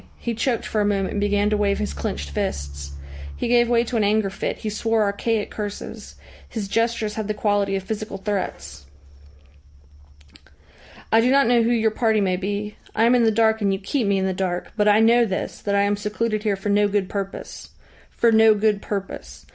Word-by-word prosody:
He 235 - -3
choked 235 +1 -1
for 215 - -1
a - - +2
moment 200 -2 0
and 205 - -2
began 205 0 +1
to 210 - +2
wave 200 -1 +1
his - - -3
clenched 70 0 -4
fists. 70 0 -4 0.4
He - - -3
gave 240 0 +3
way 235 -1 +3
to 240 0 -3
an 215 - +2
anger 205 -1 +1
fit, - - -3
he 215 - -4
swore 225 +1 +1
archaic 210 +2 -1
curses. 205 -1 -7 0.3
His 215 -4 -4
gestures 230 0 0
had 220 -2 -4
the 215 - -2
quality 205 -2 +1
of 195 - -3
physical 215 0 -5
threats. 75 - -4 2.2
"I 225 - +5
do 245 - +2
not 275 +1 +4
know 240 0 +4
who 230 - +1
your 225 -2 +2
party 220 -1 +1
may 190 -2 +1
be. 205 +3 -4 0.2
I 220 - +2
am 235 +2 +5
in 245 -2 +4
the 220 - +4
dark, 220 0 +2
and 200 -1 +2
you 195 - 0
keep 215 +4 -1
me 200 -1 +2
in 190 - 0
the 190 - 0
dark. 180 -1 -3
But 210 -1 +2
I 210 +1 +5
know 235 +2 +5
this, 190 -5 -3
that 200 -1 -1
I 200 - +3
am 205 0 +1
secluded 215 +1 -2
here 210 -2 0
for 195 +2 -5
no 205 0 +3
good 205 -2 0
purpose. 195 0 -6 0.4
For 235 - +2
no 220 -1 +6
good 210 -1 +1
purpose. 195 -2 -6
210 Hz, 210 wpm, -22 LUFS, 195-225 Hz, 2.2 s, no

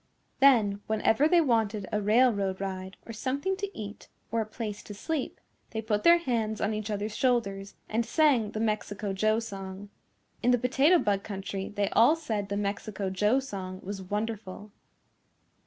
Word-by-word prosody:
Then 220 -7 +5
whenever 220 +5 +3
they 345 +1 +5
wanted 220 - +1
a 210 - 0
railroad 205 -3 +3
ride 190 -1 -5
or 230 - -7
something 275 - -1
to 400 0 -5
eat 205 0 -7 0.2
or 230 0 +1
a 215 - -4
place 215 -2 -5
to 205 - -9
sleep, 305 +6 -3 0.3
they 220 - -3
put 210 -1 0
their 340 0 +8
hands 230 -9 -1
on 215 - 0
each 215 0 -4
other's 210 +1 -3
shoulders 200 -7 0
and 225 +2 0
sang 265 -6 +3
the 215 - -5
Mexico 210 -2 -2
Joe 215 +3 +2
song. 195 -2 -7 0.5
In 245 - +2
the 250 - +5
Potato 270 +8 +4
Bug 200 -10 +1
Country 195 -1 -5
they 205 -1 -1
all 245 +8 +5
said 220 -11 -3
the 200 - -1
Mexico 200 -1 -3
Joe 210 +7 +2
song 190 -8 -6
was 195 0 -5
wonderful. 210 0 -4
215 Hz, 170 wpm, -28 LUFS, 200-240 Hz, 0.5 s, their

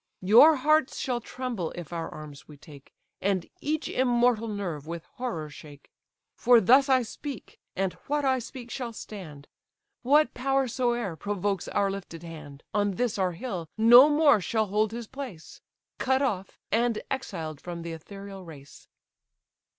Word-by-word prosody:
Your 240 +12 +8
hearts 305 +1 +2
shall 245 -2 -2
tremble, 240 -10 -4
if 175 -1 -8
our 165 -1 -3
arms 150 -3 -10
we 150 - -13
take, 140 -1 -15 0.3
And 190 -3 0
each 310 +1 -2
immortal 240 -2 +2
nerve 180 -9 -4
with 170 0 -6
horror 235 -12 -3
shake. 145 -1 -13 0.4
For 245 -1 +6
thus 265 +7 +5
I 260 -2 +4
speak, 260 +1 -8 0.2
and 190 -1 -1
what 290 0 0
I 260 -1 +2
speak 245 0 -9
shall 240 -2 -4
stand; 160 -11 -9 0.5
What 295 +5 +4
power 270 +1 +1
soe'er 240 - -1
provokes 200 0 -2
our 200 -1 +1
lifted 180 -4 -8
hand, 155 -4 -10
On 205 -1 +1
this 240 -1 -1
our 185 -2 +1
hill 180 -5 -5
no 240 +6 +8
more 295 -7 +5
shall 220 +5 0
hold 210 +2 0
his 235 0 -5
place; 250 - -9 0.4
Cut 265 +1 +2
off, 195 -8 -2
and 230 0 +1
exiled 165 - -4
from 170 -1 -6
the 170 - -5
ethereal 195 +4 -9
race." 145 -5 -13
210 Hz, 155 wpm, -27 LUFS, 170-255 Hz, 0.5 s, Your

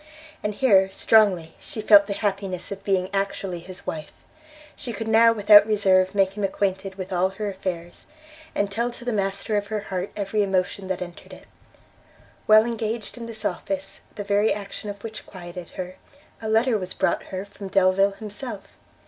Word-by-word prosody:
And 210 0 -2
here 195 -7 +4
strongly 190 -6 +3
she - - -8
felt 205 -2 +7
the 200 - -2
happiness 195 -3 -2
of 195 0 -6
being 190 -2 +1
actually 195 -2 -2
his 180 +2 -10
wife; 155 -1 -5 0.6
she 245 -5 -6
could 225 +1 -5
now 225 +1 +6
without 205 -1 +7
reserve 190 -2 +3
make 195 -1 +2
him 210 - -4
acquainted 190 0 -1
with 190 0 -6
all 180 +1 +2
her 205 +1 -4
affairs, 180 -3 -6 0.5
and 200 0 0
tell 235 +4 0
to 240 0 -10
the 245 - -1
master 200 +1 -1
of 205 0 -2
her 215 0 -2
heart 185 +1 -2
every 210 +1 -1
emotion 190 0 0
that 185 -1 -2
entered 175 -1 -12
it. - - -13 1.0
While 215 +1 +7
engaged 225 -2 -3
in 235 -1 -7
this 220 -2 -7
office, 195 -1 -3 0.2
the 205 - -4
very 205 +2 +2
action 205 +1 -5
of 200 0 -8
which 220 -1 -7
quieted 175 -2 -9
her, 185 0 -5 0.4
a 220 - -3
letter 225 +1 +3
was 185 -1 -5
brought 190 - 0
her 190 +1 -5
from 200 0 -9
Delvile 195 +1 +3
himself. 210 +1 -7
200 Hz, 180 wpm, -24 LUFS, 190-215 Hz, 1.0 s, felt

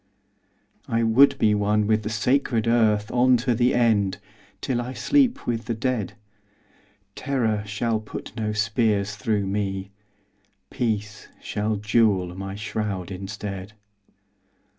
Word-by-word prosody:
I 115 0 +1
would 135 +5 +5
be 105 -4 +3
one 105 +1 +1
with 110 +1 +2
the 105 - -4
sacred 115 +1 +1
earth 110 -2 +2
On 125 +1 +4
to 120 +1 0
the 120 +2 +2
end, 110 -5 +2 0.4
till 120 -2 -1
I 125 +2 -5
sleep 260 - +2
with 115 -2 -2
the 115 - -2
dead. 120 -4 -2 1.0
Terror 115 -7 -1
shall 110 +2 -1
put 110 0 -9
no 110 -3 -2
spears 105 -1 0
through 100 -1 -1
me. 95 -1 -3 0.8
Peace 110 -4 -3
shall 105 +1 -2
jewel 105 -4 +1
my 95 +1 -6
shroud 105 -3 -4
instead. 100 +1 -6
110 Hz, 125 wpm, -24 LUFS, 105-120 Hz, 1.0 s, would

